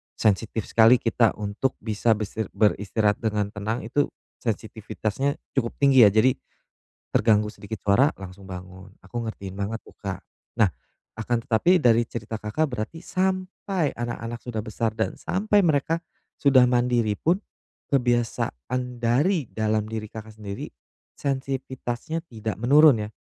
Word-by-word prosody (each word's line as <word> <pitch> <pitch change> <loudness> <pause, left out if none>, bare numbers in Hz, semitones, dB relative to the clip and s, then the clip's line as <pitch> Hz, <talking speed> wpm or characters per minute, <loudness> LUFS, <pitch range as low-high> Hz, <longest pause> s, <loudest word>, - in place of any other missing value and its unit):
sensitif 110 +1 +1
sekali 115 +2 +7
kita 115 -1 +2
untuk 105 +5 -2
bisa 110 0 +2
besir 105 0 -4
beristirahat 105 0 +2
dengan 105 -2 -1
tenang 110 +3 -3
itu, 135 +6 +1 0.3
sensitivitasnya 110 +3 -2 0.2
cukup 120 -4 -1
tinggi 135 -5 +7
ya. - - +6
Jadi, 110 +6 +4 0.8
terganggu 105 -2 +3
sedikit 110 +2 -7
suara 120 +9 +5
langsung 95 0 -10
bangun. 95 +1 -9 0.2
Aku 120 - -5
ngertiin 105 -4 -6
banget 100 +3 -4
tuh - - -16
Kak. 95 -3 -5 0.3
Nah, 105 -6 +3 0.5
akan 115 +1 -1
tetapi 170 +11 +4
dari 120 -6 +3
cerita 110 -1 -5
Kakak 105 +9 0
berarti 125 +9 -5
sampai 185 -3 -1
anak-anak 120 0 -5
sudah 110 -3 -5
besar 110 0 -2
dan - - 0
sampai 205 +2 +2
mereka 165 -1 +1 0.4
sudah 130 -3 +6
mandiri 120 -3 +2
pun 170 +3 +3 0.6
kebiasaan 120 - 0
dari 140 +9 +2
dalam 110 -1 0
diri 110 -1 -5
Kakak 110 0 -10
sendiri 100 -1 -6 0.4
sensitivitasnya 135 +2 -3
tidak 110 -6 -5
menurun 135 -1 +5
ya? 105 - -8
115 Hz, 135 wpm, -25 LUFS, 105-130 Hz, 0.8 s, sekali